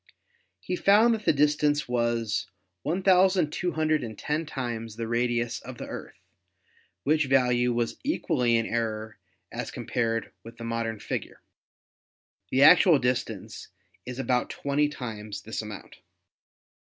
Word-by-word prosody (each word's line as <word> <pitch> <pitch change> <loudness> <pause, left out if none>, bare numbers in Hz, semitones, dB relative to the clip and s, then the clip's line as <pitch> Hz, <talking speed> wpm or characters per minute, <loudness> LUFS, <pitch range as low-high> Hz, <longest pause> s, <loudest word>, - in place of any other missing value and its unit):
He 180 - -3
found 210 +6 +5
that 220 -1 -4
the - - +5
distance 150 0 +2
was 115 -3 0 0.3
1,210 160 - +1
times 115 -5 -4
the 115 0 -4
radius 120 0 0
of - - -9
the - - -6
Earth, - - -8 0.9
which 150 0 +2
value 125 -2 +3
was 120 -1 -1
equally 150 - +1
in 115 - 0
error 110 -2 -3 0.3
as - - -4
compared 115 -1 -2
with 115 +1 -12
the 115 - -8
modern 115 -1 -2
figure. - - -5 1.1
The 135 +2 +4
actual 165 +2 +8
distance 125 -5 -3 0.4
is 125 0 -7
about 125 -2 0
twenty 145 +1 0
times 105 -7 -7
this 110 - -4
amount. 105 -2 -9
125 Hz, 120 wpm, -27 LUFS, 115-150 Hz, 1.1 s, actual